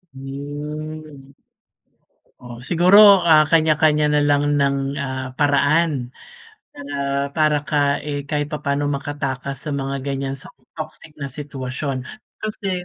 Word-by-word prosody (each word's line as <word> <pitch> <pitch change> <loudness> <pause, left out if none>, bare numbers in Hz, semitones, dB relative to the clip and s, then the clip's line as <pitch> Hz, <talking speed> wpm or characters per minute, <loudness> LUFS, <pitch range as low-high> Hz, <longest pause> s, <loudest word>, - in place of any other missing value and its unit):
Hmm. 145 +1 -7 1.1
Oh, 120 -1 -10
siguro, 180 +3 +5 0.2
ah, 155 -3 +5
kanya-kanya 155 -1 +3
na 150 - +3
lang 145 0 +3
ng, 140 -1 +2 0.2
ah, 130 -1 -3
paraan, 145 -2 +2 0.6
para, 145 0 -8 0.4
para 155 -1 +3
ka 150 0 -1 0.3
eh, 145 -1 -3
kahit 145 -1 -1
papa'no 145 -1 -1
makatakas 140 -1 -3
sa 150 - -4
mga 135 0 -3
gan'yan 135 -1 -3
sa - - -8 0.3
toxic 155 - -8
na 140 -1 -4
sitwasyon 135 -1 -4 0.4
kasi 195 -4 -3
145 Hz, 115 wpm, -21 LUFS, 140-155 Hz, 1.1 s, siguro